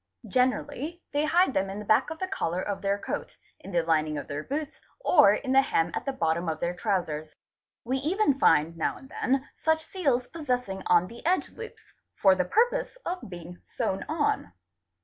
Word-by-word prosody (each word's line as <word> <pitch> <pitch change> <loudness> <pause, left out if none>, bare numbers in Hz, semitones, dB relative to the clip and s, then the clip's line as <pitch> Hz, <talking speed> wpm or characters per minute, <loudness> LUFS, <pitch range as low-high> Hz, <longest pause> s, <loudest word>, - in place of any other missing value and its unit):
Generally 265 +6 -1
they 290 +1 +1
hide 335 -1 +3
them 190 0 0
in 195 - -5
the 210 - -6
back 215 - +3
of 320 - -6
the 375 - -3
collar 180 - -2
of 200 +1 -3
_ - - -19
their 200 0 +1
coat, - - -5 0.2
in 195 - -10
the 170 -2 +2
lining 155 -2 +1
of 145 - -5
their 145 +1 -4
boots, 285 - -5 0.2
or 295 - +6
in 260 +3 -3
the 270 +1 +7
hem 170 -11 +1
at - - -3
the 275 - 0
bottom 170 -6 0
of 155 -1 -3
their 175 +2 -1
trousers. 175 -6 -2 0.5
We 255 +3 -1
even 300 0 +1
find 160 - +4
now 165 - -1
and 265 - -14
then 270 +2 0 0.2
such 320 0 +2
seals 275 -10 0
possessing 250 -11 -3
on 175 0 +5
_ - - -9
the 235 +3 -12
edge 365 +3 +1
loops, 455 0 -11 0.2
for 195 -2 +5
the 185 -1 0
purpose 485 - +1
of 360 - -4
being 175 0 -9
sewn 190 - -2
on. 295 - 0
235 Hz, 205 wpm, -27 LUFS, -, 0.5 s, the